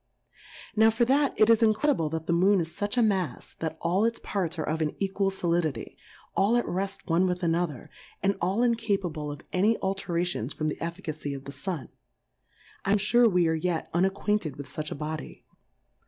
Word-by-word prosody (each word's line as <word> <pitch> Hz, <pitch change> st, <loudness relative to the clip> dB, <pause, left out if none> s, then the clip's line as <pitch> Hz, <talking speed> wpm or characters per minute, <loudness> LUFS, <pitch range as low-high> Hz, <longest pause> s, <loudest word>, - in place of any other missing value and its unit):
Now, 220 Hz, +1 st, +6 dB
for 225 Hz, +2 st, +2 dB
that 275 Hz, +3 st, +2 dB
it 215 Hz, -, +6 dB
is 230 Hz, 0 st, +5 dB
incredible 220 Hz, -, +2 dB
that 160 Hz, 0 st, -4 dB
the 170 Hz, -, +1 dB
Moon 190 Hz, +3 st, +4 dB
is 165 Hz, -1 st, -2 dB
fuch 205 Hz, +6 st, -3 dB
a -, -, +5 dB
Mafs, 190 Hz, -, -1 dB
that 160 Hz, -1 st, -3 dB
all 180 Hz, +5 st, +1 dB
its 230 Hz, 0 st, +1 dB
parts 180 Hz, -4 st, -3 dB
are 155 Hz, -, -3 dB
of 160 Hz, +1 st, -1 dB
an 150 Hz, -1 st, -1 dB
equal 195 Hz, 0 st, 0 dB
Solidity, 170 Hz, -9 st, -1 dB, 0.4 s
all 215 Hz, +5 st, +3 dB
at 240 Hz, -, 0 dB
reft 195 Hz, +2 st, -3 dB
one 175 Hz, +3 st, +3 dB
with 180 Hz, 0 st, -2 dB
another, 165 Hz, -5 st, -1 dB, 0.4 s
and 195 Hz, 0 st, +2 dB
all 190 Hz, +7 st, +1 dB
incapable 195 Hz, -10 st, 0 dB
of 145 Hz, -, -8 dB
any 210 Hz, +5 st, +3 dB
alterations 175 Hz, -, -2 dB
from 155 Hz, 0 st, -1 dB
the -, -, -4 dB
eiBcacy 165 Hz, -4 st, -4 dB
of 135 Hz, -, -8 dB
the 140 Hz, -, -6 dB
Sun: 150 Hz, +2 st, -4 dB, 0.9 s
I 195 Hz, -, +2 dB
am -, -, +5 dB
fure 235 Hz, +3 st, +5 dB
we 180 Hz, -2 st, +3 dB
are 160 Hz, -, +2 dB
yet 165 Hz, 0 st, -1 dB
unacquainted 190 Hz, -2 st, 0 dB
with 140 Hz, -, -7 dB
fuch 150 Hz, +2 st, -4 dB
a -, -, -3 dB
Body 155 Hz, +1 st, -6 dB
180 Hz, 190 wpm, -27 LUFS, 160-205 Hz, 0.9 s, Now